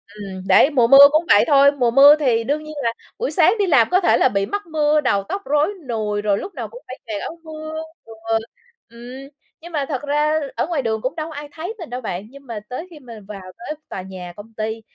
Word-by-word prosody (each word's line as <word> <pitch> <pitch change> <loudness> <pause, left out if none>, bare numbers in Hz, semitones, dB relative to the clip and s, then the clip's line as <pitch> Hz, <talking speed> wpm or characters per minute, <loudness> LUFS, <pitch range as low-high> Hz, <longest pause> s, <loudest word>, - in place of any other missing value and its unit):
ừm, 195 -2 -8
đấy, 285 - +6
mùa 250 -6 +3
mưa 275 +2 +10
cũng 310 +3 +2
vậy 205 - +6
thôi, 280 -1 +6
mùa 250 -5 0
mưa 285 +4 +8
thì 235 -5 +1
đương 295 +5 -2
nhiên 310 0 -9
là 230 0 0 0.3
buổi - - -2
sáng 365 +3 +4
đi 395 - +2
làm 275 -9 +4
có 370 - +4
thể - - +3
là 260 - +3
bị 200 -2 -1
mắc 410 - -4
mưa, 305 -1 +1
đầu 200 -7 0
tóc 400 - -3
rối 295 +4 +1 0.2
nùi, 210 -2 -2
rồi 205 -1 +1
lúc 385 - -7
nào - - -5
cũng - - -13
phải 255 - -9
kè 210 -2 -4
áo 335 - -7
mưa, 315 0 -7 0.2
ừ, 225 - -12 0.8
ừm. 250 +4 -11 0.3
Nhưng 345 +1 -11
mà 290 -3 -1
thật 270 -3 -3
ra 300 +2 +1 0.2
ở - - -1
ngoài 325 -6 -1
đường 220 -2 -2
cũng 260 +5 -3
đâu 315 0 -5
có 310 - -10
ai 290 0 -8
thấy 345 +7 -6
mình 335 - -8
đâu 250 +1 -5
bạn, 200 -1 -5
nhưng 280 0 -16
mà 225 -3 -5
tới 320 +8 -6
khi 305 - -12
mà 235 -5 -11
vào 200 -2 -8 0.2
tới 240 +6 -6
tòa 190 - -5
nhà 185 -2 -9
công 215 +2 -13
ty 220 +1 -4
275 Hz, 255 wpm, -20 LUFS, 225-310 Hz, 0.8 s, mưa